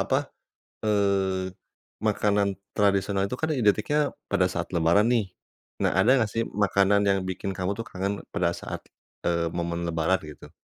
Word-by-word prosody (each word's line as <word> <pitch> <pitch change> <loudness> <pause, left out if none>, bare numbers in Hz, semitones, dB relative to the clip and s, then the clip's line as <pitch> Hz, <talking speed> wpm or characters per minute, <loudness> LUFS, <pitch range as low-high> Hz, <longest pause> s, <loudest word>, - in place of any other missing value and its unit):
apa, - - +1 0.5
eee, 95 -3 +1 0.5
makanan 100 -2 +1 0.2
tradisional 100 -1 +1
itu 125 - -3
kan 160 +2 -1
identiknya 120 +3 +2 0.3
pada 90 - +3
saat 90 0 -4
Lebaran, 85 +5 +4
nih. 110 -5 +1 0.6
Nah, - - +3
ada 110 - +4 0.2
nggak 105 - -5
sih 115 - 0
makanan 100 0 +3
yang 95 0 +3
bikin 95 +1 -3
kamu 95 +1 -2
tuh 115 - -4
kangen 100 +2 -3
pada 85 -1 0
saat, - - -6 0.5
eee, 85 -1 +1
momen 85 0 -2
Lebaran 85 +2 +1
gitu? 75 -1 -11
100 Hz, 150 wpm, -26 LUFS, 90-105 Hz, 0.6 s, Lebaran